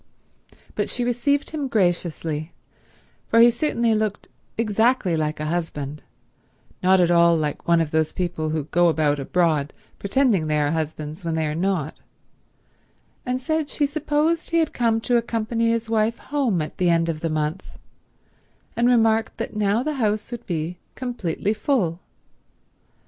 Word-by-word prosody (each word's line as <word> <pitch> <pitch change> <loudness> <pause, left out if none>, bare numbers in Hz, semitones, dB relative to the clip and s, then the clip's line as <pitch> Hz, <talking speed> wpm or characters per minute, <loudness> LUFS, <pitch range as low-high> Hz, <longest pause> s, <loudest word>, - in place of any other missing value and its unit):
But - - -2
she 245 - -1
received 275 +4 0
him 295 -3 -3
graciously, 175 - -1 0.7
for 230 - +3
he 235 +1 +8
certainly 235 -3 +1
looked 215 -2 -2 0.3
exactly 220 -3 +2
like 155 -1 -2
a 155 - -3
husband, 150 -3 -3 0.8
not 185 +1 +4
at 175 -1 +3
all 170 -1 +5
like 150 -2 -3
one 170 0 +4
of 160 -2 -1
those 160 -1 +1
people 175 -4 -2
who 155 -1 -1
go 175 +4 +2
about 150 -3 +1
abroad 155 -1 +1 0.3
pretending 200 - +2
they 150 0 +1
are 145 0 +1
husbands 155 +1 -4
when 165 -1 -2
they 160 -1 0
are 150 - -2
not, 170 -3 -1 1.3
and 250 +1 0
said 315 +2 -1
she 295 - 0
supposed 300 +2 0
he 335 - +1
had 320 -2 +1
come 230 -2 +1
to 245 +1 +2
accompany 230 0 0
his 230 0 0
wife 225 +1 +1
home 255 - -1
at 155 - -9
the 180 -1 +3
end 165 0 +2
of 160 -2 -2
the 165 - -2
month, 155 +4 -2 1.1
and 235 +1 +2
remarked 225 -2 +2
that - - -5
now 210 +3 +1
the 305 +2 -1
house 215 +1 0
would 240 -1 -7
be 170 0 -3 0.2
completely 215 -6 -2
full. 210 - 0
190 Hz, 160 wpm, -23 LUFS, 160-235 Hz, 1.3 s, he